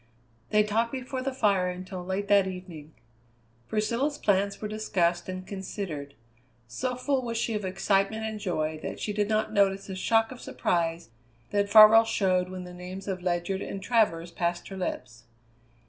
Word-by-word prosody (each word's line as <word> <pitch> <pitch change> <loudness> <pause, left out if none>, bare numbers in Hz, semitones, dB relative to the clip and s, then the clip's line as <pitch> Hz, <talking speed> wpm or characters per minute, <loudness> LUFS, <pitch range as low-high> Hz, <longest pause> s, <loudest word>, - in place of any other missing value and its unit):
They 210 0 +4
talked 225 +3 0
before 260 0 -4
the 270 +1 -2
fire 200 -8 +2
until 180 0 -6
late 190 +2 -3
that 200 -2 +5
evening. 175 -5 -8 0.7
Priscilla's 235 +7 0
plans 200 -4 +1
were 215 - -4
discussed 185 -5 0
and 185 0 -5
considered. 185 -8 -6 0.5
So 250 - -3
full 265 +1 0
was 230 -2 -3
she 230 0 -1
of 210 -1 -2
excitement 195 +3 0
and 220 -1 -4
joy 155 -6 -2
that - - -5
she 210 - -3
did 205 0 0
not 215 0 0
notice 195 -1 +2
the 190 - -6
shock 225 +4 +2
of 255 - -9
surprise 165 -4 -1 0.4
that 205 0 +1
Farwell 220 +1 +9
showed 185 -4 +1
when 185 0 -6
the 180 0 -10
names 180 +2 -8
of 185 -2 -3
Ledyard 180 +2 -1
and 195 - -5
Travers 190 -7 +1
passed 175 0 -2
her 195 - -7
lips. 120 -10 -5
195 Hz, 170 wpm, -28 LUFS, 180-220 Hz, 0.7 s, Farwell